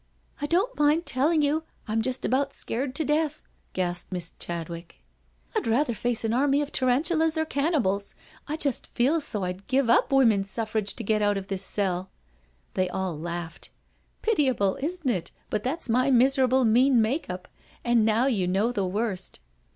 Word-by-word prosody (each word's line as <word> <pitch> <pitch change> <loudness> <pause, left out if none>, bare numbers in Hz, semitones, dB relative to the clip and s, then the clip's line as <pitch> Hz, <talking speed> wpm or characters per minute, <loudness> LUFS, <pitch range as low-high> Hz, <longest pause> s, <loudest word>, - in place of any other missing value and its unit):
" - - -27
I 290 - -1
don't 380 +9 0
mind 300 +3 +3
telling 300 +5 +2
you, 300 +2 +1 0.2
I'm 220 +1 0
just 255 +2 -2
about 275 +2 0
scared 255 +3 -3
to 315 - 0
death/' 305 +1 0 0.3
gasped 175 -1 -2
poor 185 - -4
Miss 170 -1 -3
Chadwick. 170 0 -6 0.6
"I'd - - 0
rather 240 +3 +2
face 230 +1 -1
an 225 - 0
army 280 +3 +3
of 290 - -7
tarantulas 315 +5 +2
or 315 - +1
cannibals 275 - 0 0.2
— - - -26
I 305 - -2
just 280 -6 -2
feel 285 +7 +2
so 210 -9 -2
I'd 180 +2 -5
give 260 -3 +2
up - - +3
Women's 225 -8 +4
Suffrage 215 -2 -2
to 235 - -5
get 215 0 +1
out 205 -1 +2
of 195 -1 -6
this 195 -1 -1
cell/' 190 -2 -1 0.7
They 185 -1 0
all 185 -2 -2
laughed. 170 +1 -6 0.3
" - - -41
Pitiable, 260 - +2
isn't 330 +1 -3
it, 180 -9 0 0.2
but 215 - 0
that's 270 +8 -2
my 255 +3 +2
miserable 260 0 +4
mean 245 +3 +4
make 230 - 0
up, 180 0 -6 0.4
and 240 -2 +4
now 220 +3 +3
you 210 -9 +1
know 200 +6 +1
the 200 -6 -1
worst." 195 - -3
240 Hz, 185 wpm, -26 LUFS, 195-280 Hz, 0.7 s, Women's